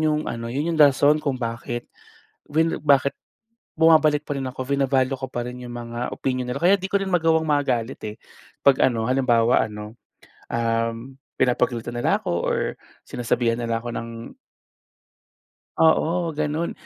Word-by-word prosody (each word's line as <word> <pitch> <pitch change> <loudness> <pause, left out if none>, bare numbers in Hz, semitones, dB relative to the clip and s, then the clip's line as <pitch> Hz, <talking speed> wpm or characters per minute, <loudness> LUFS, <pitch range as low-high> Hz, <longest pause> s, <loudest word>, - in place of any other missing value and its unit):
'yong 155 -1 +1
ano, 115 0 -5
'yon 145 +5 -1
'yong 155 - -1
rason 145 +1 +6
kung 140 -3 -1
bakit 115 +1 -4 0.6
vin 160 +2 +1
bakit 140 -2 +3 0.7
bumabalik 155 -2 +5
pa 145 - -2
rin 135 - -3
ako, 130 0 -5
bina-value 135 -1 +1
ko 130 0 -5
pa 120 - -3
rin 125 0 -7
'yong 120 - -8
mga 120 0 -6 0.2
opinyon 130 -1 -2
nila. 140 - -3
Kaya 185 +3 +5
'di 190 0 -5
ko 200 - +3
rin 195 - -2
magawang 160 -2 +2
magalit, 135 -4 0
eh. 105 0 -5 0.5
'Pag 140 -2 +5
ano, 115 -3 -1
halimbawa 120 -3 +3
ano, 105 +1 -9 0.6
um, 115 +2 -2 0.2
pinapagalitan 120 -1 0
nila 120 - +1
ako - - -4 0.2
or - - +1 0.5
sinasabihan 120 -1 0
nila 115 -1 -2
ako 120 0 -5
ng 115 0 -7 1.4
Oo 165 +1 +2
gano'n. 155 +2 -2
130 Hz, 155 wpm, -23 LUFS, 115-150 Hz, 1.4 s, rason